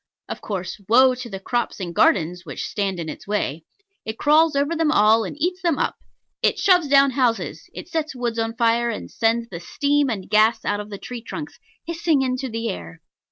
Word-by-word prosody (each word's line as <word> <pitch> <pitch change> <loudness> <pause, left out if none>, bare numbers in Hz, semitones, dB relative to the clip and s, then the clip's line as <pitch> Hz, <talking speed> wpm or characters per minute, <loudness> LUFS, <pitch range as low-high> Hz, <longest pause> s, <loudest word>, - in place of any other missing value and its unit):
Of - - -6
course, 195 0 -5
woe 255 +3 +6
to 250 -1 -7
the 195 -2 -6
crops 240 +4 -2
and 175 -3 -5
gardens 175 0 +2
which 145 -6 -6
stand 195 -3 -2
in 165 - -4
its 155 - -8
way. 165 -7 -2 0.4
It 220 0 -5
crawls 310 +1 +4
over 285 +4 +1
them 320 -2 +2
all 220 -3 +4
and 235 - -7
eats 360 +4 -1
them 340 -5 +1
up. - - -1 0.5
It - - +2
shoves 360 -5 +4
down 275 0 +5
houses; 245 -3 -1
it - - -8
sets 320 -5 -3
woods 240 -2 -2
on 225 0 -2
fire, 235 +1 +2
and 220 - -6
sends 230 +1 0
the 170 - -7
steam 285 +9 0
and 200 -6 -4
gas 215 +2 +3
out 205 0 0
of 210 0 -7
the 200 - -6
tree 245 +3 -7
trunks 295 +6 -8 0.3
hissing 330 -4 +1
into 255 0 -2
the 230 0 -3
air. 85 -1 -6
235 Hz, 205 wpm, -22 LUFS, 205-285 Hz, 0.5 s, woe